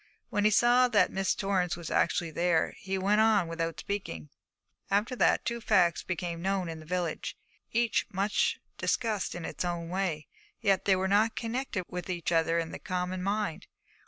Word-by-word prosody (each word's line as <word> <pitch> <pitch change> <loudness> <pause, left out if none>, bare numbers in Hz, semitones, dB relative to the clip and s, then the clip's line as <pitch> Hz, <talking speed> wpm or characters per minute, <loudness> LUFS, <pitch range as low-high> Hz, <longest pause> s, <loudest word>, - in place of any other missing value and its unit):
When 205 0 +1
he - - +7
saw 240 +4 +5
that 225 -4 +3
Miss 195 0 0
Torrance 185 -3 0
was 170 -2 -7
actually 170 -1 +1
there, 170 0 +1
he 195 0 -3
went 205 +3 +3
on 215 -5 +4
without 165 0 -3
speaking. 85 - -5 0.6
After 210 +6 +1
that - - +3
two 235 0 -2
facts 175 -6 +3
became 175 -2 -4
known 190 -1 0
in 160 -1 -6
the 155 - -13
village, 175 -2 -2 0.3
each 235 -1 +1
much 200 +2 +1 0.2
discussed 220 -8 0
in 175 -2 -5
its - - -4
own 170 -1 -3
way; 175 -5 -2 0.3
yet 195 -3 +2
they 195 - +5
were 190 +1 0
not 210 +3 +3
connected 230 -4 -2
with 180 +1 -6
each 175 -2 -2
other 165 0 +2
in 165 -1 -2
the - - -7
common 180 -1 -3
mind. 200 -3 -2
185 Hz, 180 wpm, -29 LUFS, 170-210 Hz, 0.6 s, he